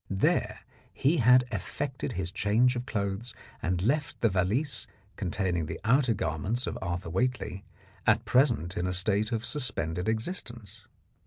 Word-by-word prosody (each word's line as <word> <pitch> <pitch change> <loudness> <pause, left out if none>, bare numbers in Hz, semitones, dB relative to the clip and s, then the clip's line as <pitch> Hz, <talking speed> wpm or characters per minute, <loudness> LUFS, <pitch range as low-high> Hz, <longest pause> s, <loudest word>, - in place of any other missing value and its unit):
There 95 -1 +1 0.3
he 150 +6 +2
had 125 0 +6
effected 125 +6 -3
his 90 -2 -2
change 110 +6 +3
of 120 +1 -4
clothes 100 +2 -3 0.3
and 90 +1 0
left 145 +6 0
the 115 - +3
valise 110 +9 +1 0.3
containing 90 -4 -1
the - - -5
outer 125 +1 +3
garments 100 - -1
of - - -3
Arthur 90 -2 -3
Whately, 120 -2 -1 0.4
at - - +4
present 120 - +2
in 90 +1 0
a 90 - -1
state 100 +4 +1
of 115 0 -1
suspended 100 - -2
existence. 115 - -5
110 Hz, 145 wpm, -29 LUFS, 95-125 Hz, 0.4 s, had